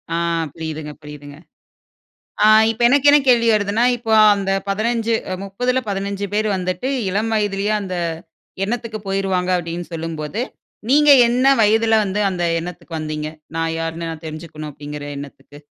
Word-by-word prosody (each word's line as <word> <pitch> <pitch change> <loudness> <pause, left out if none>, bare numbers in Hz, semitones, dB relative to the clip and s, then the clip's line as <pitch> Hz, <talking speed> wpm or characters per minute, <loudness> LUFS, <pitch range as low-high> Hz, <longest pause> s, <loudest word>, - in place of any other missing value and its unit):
ஆ - - 0 0.4
புரியுதுங்க, 155 -2 -6
புரியுதுங்க. 145 -1 -11 1.1
ஆ - - +7 0.2
இப்ப 225 +1 -4
எனக்கு 285 +3 +4
என்ன 295 - +7
கேள்வி 235 -2 +4
வருதுன்னா, 210 +2 +1
இப்போ 225 -2 -3 0.2
அந்த 195 -1 -1 0.2
15, 225 +3 0 0.2
அ - - -1
30ல 250 +6 -1
15 200 0 -3
பேர் 215 +1 +1
வந்துட்டு 185 +6 -3 0.2
இளம் 210 +4 -1
வயதுலயே 205 -1 0
அந்த 185 -2 -4 0.7
எண்ணத்துக்கு 225 +1 -4
போயிருவாங்க, 190 -2 0
அப்பிடின்னு 175 0 -5
சொல்லும்போது, 165 +5 -4 0.5
நீங்க 295 +2 +5 0.2
என்ன 250 +2 +1 0.2
வயதுல 220 +1 +3
வந்து, 200 +1 -2
அந்த 175 -2 -2 0.2
எண்ணத்துக்கு 170 -1 -7
வந்தீங்க? 155 0 -4 0.3
நான் 165 0 -1
யாருன்னு, 165 0 -4
நான் 160 0 -11
தெரிஞ்சுக்கணும் 155 -1 -7
அப்படிங்கிற 145 0 -8
எண்ணத்துக்கு? 140 0 -11
195 Hz, 140 wpm, -20 LUFS, 160-220 Hz, 1.1 s, ஆ